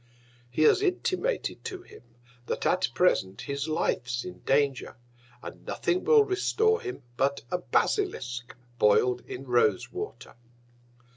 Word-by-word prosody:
He 140 +6 +1
has 265 - +5
intimated 390 +5 -1
to 375 -1 -6
him, - - -15 0.5
that - - -3
at 185 +1 +2
present 100 - +2
his 140 +1 -3
Life's 125 -5 -1
in 180 - -8
Danger, 135 -3 0 0.5
and - - -9
nothing 365 +1 -1
will 455 -2 +6
restore 440 +3 +1
him 385 -4 -6
but 140 +1 +1
a 180 - 0
Basilisk, 125 - -1 0.2
boil'd 125 +4 +4
in 130 +2 -7
Rose 125 +3 +2
Water. 415 +3 -7
155 Hz, 130 wpm, -28 LUFS, -, 0.5 s, will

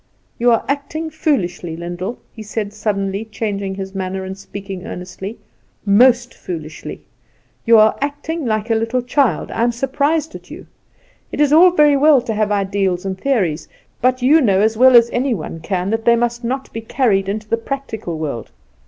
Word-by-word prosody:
"You 240 +1 +3
are 230 - +2
acting 310 +3 -3
foolishly, 180 - -1
Lyndall," 175 +6 -5 0.2
he 220 - -10
said, 210 -1 -4
suddenly 200 -1 -2
changing 200 -3 -4
his 190 0 -6
manner, 190 0 -3
and 190 0 -6
speaking 195 -1 -8
earnestly, 190 +4 -7 0.5
"most 240 +4 +4
foolishly. 160 -3 -7 0.6
You 230 0 +7
are 215 0 +5
acting 290 +3 -3
like 215 +1 -1
a - - +5
little 230 +3 0
child; 255 +1 0
I - - -2
am 240 +1 +3
surprised 285 +6 -1
at - - -11
you. - - -10 0.7
It - - -5
is 295 -1 +4
all 350 +4 +8
very 300 -5 +4
well 295 0 +5
to 230 - -3
have 215 0 0
ideals 195 -2 0
and 190 -1 -2
theories; 190 - -1 0.3
but 255 +1 +1
you 305 +5 +5
know 200 -7 +3
as 220 +2 +2
well 255 +2 +6
as 235 -1 +7
any 250 0 0
one 165 -2 -6
can 185 +3 -2
that 225 0 -2
they 235 - +6
must 240 +1 -1
not 265 +3 -4
be 225 - -4
carried 220 -5 +1
into 215 +1 -4
the 230 - +1
practical 225 - -5
world. 140 -8 -4
220 Hz, 180 wpm, -18 LUFS, 195-255 Hz, 0.7 s, all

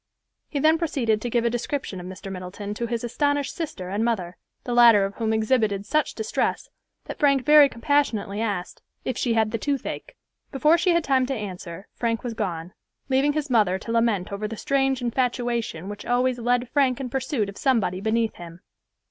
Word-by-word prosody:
He 290 - -3
then 315 +3 +4
proceeded 235 -10 0
to 240 - -3
give 235 0 +1
a - - +3
description 240 -4 -3
of 180 - -8
Mr. 190 +1 -8
Middleton 190 +2 -6
to 235 +3 -3
his 235 0 -3
astonished 285 +3 0
sister 280 - -5
and 205 +3 -1
mother, 190 -7 -1 0.3
the 245 - -3
latter 230 -4 +7
of 195 - -5
whom 220 -1 0
exhibited 220 -3 +1
such 305 +6 0
distress 440 +2 -2 0.3
that - - -7
Frank 275 -3 +3
very 300 -1 +8
compassionately 230 -6 0
asked, 200 -5 -3 0.2
"if 255 - -1
she 235 -3 0
had 220 -1 +2
the 230 - -2
toothache." 285 - -3 0.4
Before 300 +4 +4
she 345 +1 +2
had 340 - +2
time 265 -3 +2
to 270 - -2
answer, 190 -4 -7
Frank 230 -1 -2
was 240 -2 -3
gone, 180 -5 -4 0.4
leaving 270 +2 +3
his 300 -2 -3
mother 205 -6 +3
to 230 - -7
lament 230 -6 +1
over 200 +2 -3
the 225 +1 -7
strange 270 -1 0
infatuation 240 -6 -1
which 205 0 -7
always 250 +1 +1
led 245 +1 +1
Frank 265 -1 +2
in 265 - -3
pursuit 260 -4 -1
of 200 - -8
somebody 220 -9 +1
beneath 220 +1 +1
him. 170 0 -11
235 Hz, 190 wpm, -24 LUFS, 205-270 Hz, 0.4 s, very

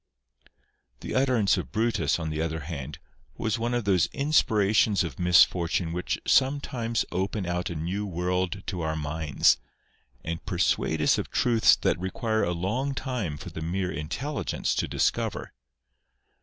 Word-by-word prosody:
The - - -5
utterance 125 -7 +3
of 75 -8 -5
Brutus, 115 +2 +1
on 80 -2 -4
the 75 0 -2
other 80 -1 -2
hand, 70 -4 -6 0.4
was 110 +1 -1
one 120 +1 -1
of 120 - 0
those 95 -4 +3
inspirations 110 -8 +2
of 80 -7 -6
misfortune 85 -1 +3
which 90 +1 -2
sometimes 130 -4 +1
open 95 +2 -2
out 90 0 -2
a 85 - -5
new 90 +7 -3
world 90 +2 -2
to 90 -3 -4
our 80 0 -1
minds, 75 -1 +2 0.6
and 80 +1 -4
persuade 80 -3 0
us - - +3
of - - -4
truths 115 -2 +4
that - - 0
require 110 +4 -1
a 85 - 0
long 115 +11 -2
time 115 - -3
for - - -9
the 80 - -7
mere 90 +3 -2
intelligence 115 - -3
to - - -1
dis - - +2
cover. - - -5
90 Hz, 155 wpm, -27 LUFS, 80-115 Hz, 0.6 s, truths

